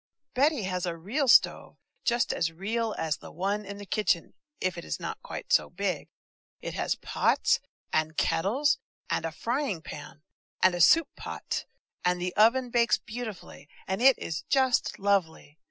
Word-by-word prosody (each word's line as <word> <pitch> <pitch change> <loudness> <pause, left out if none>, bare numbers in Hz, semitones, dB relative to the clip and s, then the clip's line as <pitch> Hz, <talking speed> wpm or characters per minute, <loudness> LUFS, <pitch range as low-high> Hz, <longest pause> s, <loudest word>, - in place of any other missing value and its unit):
BETTY 280 -2 +2
has 180 -1 -2
a 170 -1 -3
real 240 - -1
stove, - - +4 0.3
just 240 0 +1
as 165 -1 0
real 215 +6 -2
as 160 -2 -1
the - - -12
one 200 +5 -1
in 200 0 -8
the 205 - -8
kitchen, 185 -4 0 0.3
if 185 -1 -1
it - - -7
is 75 -1 -4
not - - -5
quite - - -5
so - - +4
big. 185 -3 -2 0.5
It - - -6
has - - -1
pots - - +1 0.3
and 155 0 0
kettles 240 - +2 0.3
and - - 0
a 165 - -2
frying 230 - -2
pan, 150 0 -9 0.4
and 185 - +5
a 175 - -1
soup 320 - +6
pot, - - -5 0.4
and 180 0 +1
the 180 +1 -3
oven 240 +4 +4
bakes 235 -1 +3
beautifully, 220 -9 -8 0.2
and 190 +4 -2
it 265 0 +7
is 160 -2 -4
just 260 -2 +2
lovely! 180 -6 -1
195 Hz, 170 wpm, -28 LUFS, 170-235 Hz, 0.5 s, it